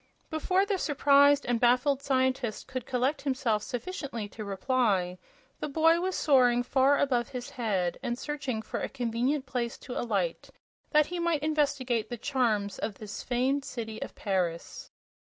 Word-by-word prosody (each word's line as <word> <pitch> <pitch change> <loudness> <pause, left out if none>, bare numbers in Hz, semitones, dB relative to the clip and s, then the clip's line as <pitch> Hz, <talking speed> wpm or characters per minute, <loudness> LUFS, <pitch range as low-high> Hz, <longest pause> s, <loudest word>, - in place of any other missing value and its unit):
Before 365 +5 +1
the 400 -2 -1
surprised 285 -1 +4
and 240 -1 +1
baffled 255 +3 +3
scientist 260 -4 0
could 255 -2 -5
collect 265 +3 0
himself 255 -6 0
sufficiently 245 - -5
to 215 - -8
reply, 200 -4 0 0.4
the - - -3
boy 325 +3 +4
was 370 +1 -1
soaring 250 -4 +4
far 270 +3 +3
above 245 -4 +1
his 250 -3 -6
head 195 -7 -1
and 240 -2 -2
searching 275 -6 -3
for - - -4
a - - -3
convenient 250 +3 -1
place 245 -3 -3
to 250 - -8
alight, 195 -8 -2 0.4
that 300 -1 +4
he 355 +2 -5
might 335 -3 0
investigate 280 -7 0
the 240 - -4
charms 220 -7 0
of 210 -1 -3
this 205 -1 -7
famed 260 +3 0
city 220 -4 -6
of - - -6
Paris. 180 -5 -2
255 Hz, 155 wpm, -29 LUFS, 225-285 Hz, 0.4 s, surprised